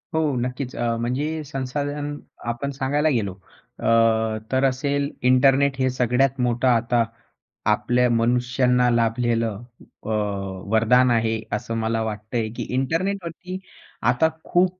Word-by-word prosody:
हो. 160 - +3 0.2
नक्कीच. 125 +1 -4
अ, 115 -1 0
म्हणजे 145 +6 -2
संसाधन 145 +2 -3 0.4
आपण 140 +4 -4
सांगायला 145 +3 0
गेलो, 105 -8 0 0.5
अ, - - -2 0.6
तर 130 +1 +2
असेल, 140 +2 -1 0.2
इंटरनेट 135 +2 +4
हे 130 0 +2
सगळ्यात 130 +2 +1
मोठं 125 +1 +1
आता, 120 0 +3 0.7
आपल्या 125 0 +2
मनुष्यांना 125 +1 +2
लाभलेलं 115 -2 0 0.4
अ, - - -6 0.6
वरदान 125 +3 +5
आहे. 115 -1 +1
असं 110 +2 -3
मला 115 0 0
वाटतंय, 110 +1 -3
की - - -3
इंटरनेटवरती 180 +5 -2 0.5
आता 160 +6 +2
खूप 180 +1 +1
125 Hz, 120 wpm, -23 LUFS, 115-140 Hz, 0.7 s, वरदान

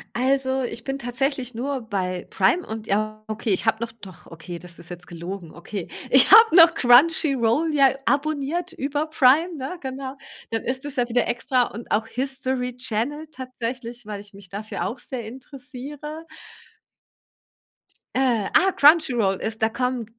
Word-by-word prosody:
Also, 265 +1 +1
ich 235 -1 -4
bin 270 +1 -3
tatsächlich 255 0 -2
nur 265 +3 -3
bei 185 -5 -3
Prime 200 - +2
und, 220 0 -7
ja, 215 +1 -1
okay, 220 0 -3
ich 190 - 0
habe 220 -1 +2
noch 230 - -5
doch, 195 -6 -14
okay, 165 +1 -8
das 175 0 -11
ist 170 - -7
jetzt 175 0 -7
gelogen, 175 0 -7
okay. 175 +2 -6 0.2
Ich 265 0 +5
habe 445 -3 +8
noch 335 -1 +8
Crunchy 285 +3 +5
Roll 265 +7 +1
ja 275 -2 +6 0.2
abonniert 305 +4 -1
über 290 +3 -2
Prime, 315 +3 +3
ne, 275 +7 -5
genau. 265 0 -6 0.4
Dann 225 -1 -1
ist 260 +2 -3
es 290 -1 -5
ja 245 -2 +1
wieder 240 0 +1
extra 250 +1 +1
und 230 0 -8
auch 220 +1 +1
History 260 -1 -2
Channel 260 +6 -2
tatsächlich, 245 -2 -6
weil 210 -1 -6
ich 205 0 -13
mich 195 -2 -13
dafür 205 +3 -4
auch 240 - -5
sehr 245 -2 -6
interessiere. 275 +5 -9 1.9
Äh, 245 -6 +2
ah, 385 +1 +5
Crunchy 300 -4 +5
Roll 195 -5 +1
ist 220 +2 -3
da 220 - +3
kommen 250 0 -2
250 Hz, 165 wpm, -23 LUFS, 220-275 Hz, 1.9 s, habe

